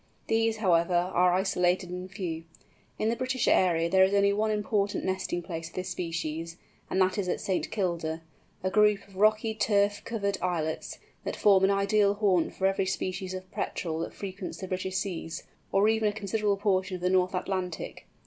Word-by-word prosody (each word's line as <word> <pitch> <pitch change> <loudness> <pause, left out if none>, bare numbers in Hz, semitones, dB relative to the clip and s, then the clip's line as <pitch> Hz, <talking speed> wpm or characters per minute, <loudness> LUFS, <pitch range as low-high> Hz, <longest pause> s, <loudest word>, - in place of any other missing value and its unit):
These, 225 0 +1
however, 175 -4 +2 0.2
are 180 0 +4
isolated 180 -1 +1
and 180 +1 -6
few. 175 -5 -5 0.5
In 215 - +1
the 230 - +1
British 255 0 -1
area 170 -3 +3
there 190 +2 +5
is 190 +1 +3
only 200 0 +4
one 215 +2 +1
important 210 -1 0
nesting 185 -2 -2
place 165 -2 -5
of - - -20
this 185 0 -3
species, 165 -1 -4 0.3
and 190 - 0
that 185 +1 +2
is 185 -2 -1
at - - -1
St. 190 -2 -1
Kilda—a 165 -2 -4
group 210 -1 +3
of 195 -1 -16
rocky 215 +2 +3
turf 205 -1 +2
covered 200 -3 -2
islets, 160 -3 -2 0.3
that - - -3
form 195 -2 +5
an - - +3
ideal 200 +1 +3
haunt 195 -5 +1
for 190 - -1
every 195 0 +2
species 185 0 -3
of 185 0 -8
Petrel 160 -2 -3
that 165 - -4
frequents 190 -1 -6
the 190 - -6
British 185 0 -2
seas, 175 -4 -4 0.3
or 195 +2 +4
even 220 -1 +2
a - - -4
considerable 205 -1 0
portion 190 -2 0
of 180 - -7
the 180 - +3
North 185 0 +2
Atlantic. 180 -2 -4
190 Hz, 185 wpm, -28 LUFS, 180-205 Hz, 0.5 s, there